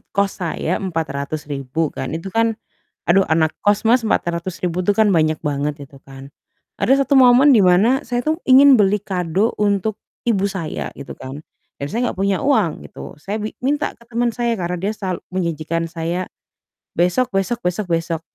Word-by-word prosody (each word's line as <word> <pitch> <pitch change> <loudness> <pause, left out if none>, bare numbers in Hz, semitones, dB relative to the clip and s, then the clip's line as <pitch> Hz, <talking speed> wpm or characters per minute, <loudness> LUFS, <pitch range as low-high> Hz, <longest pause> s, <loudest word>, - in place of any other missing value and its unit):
kos 200 -1 0
saya 170 0 -2
Rp400.000 150 -3 -3
kan, 130 - -4
itu 175 +4 -6
kan, 225 0 +2 0.5
aduh 195 +3 +5
anak 160 -1 +2
kos 205 +2 +2
Mas, 245 0 +4
Rp400.000 175 -2 -1
tuh 205 - +2
kan 220 - +5
banyak 155 -1 +2
banget, 145 0 -2
itu 140 - -17
kan. 135 0 -11 0.5
Ada 275 +2 +3
satu 285 - +2
momen 260 +2 +7
di 215 - +5
mana 205 +9 +4
saya 245 -1 -1
tuh 310 +1 +2
ingin 270 +1 +8
beli 205 -1 +3
kado 185 +2 -1
untuk 205 0 +1 0.3
ibu 205 -5 +2
saya 180 -5 -4
gitu 140 - -8
kan, 135 +2 -8 0.4
dan 140 - -2
saya 240 +6 -1
nggak - - -10
punya 195 -1 +1
uang 220 - +1
gitu, - - -10
saya 200 +8 -5
bi 215 +1 -5
minta 290 +2 0
ke 235 - -22
teman 235 +1 +1
saya, 240 0 0
karena 180 0 -2
dia 190 +4 -2
sal 190 -4 -4
menjanjikan 165 -2 -2
saya 170 +2 -3 0.7
besok 180 +9 +2
besok 195 +5 0
besok 180 +3 -2
besok, 165 -1 -1
185 Hz, 175 wpm, -20 LUFS, 165-225 Hz, 0.7 s, ingin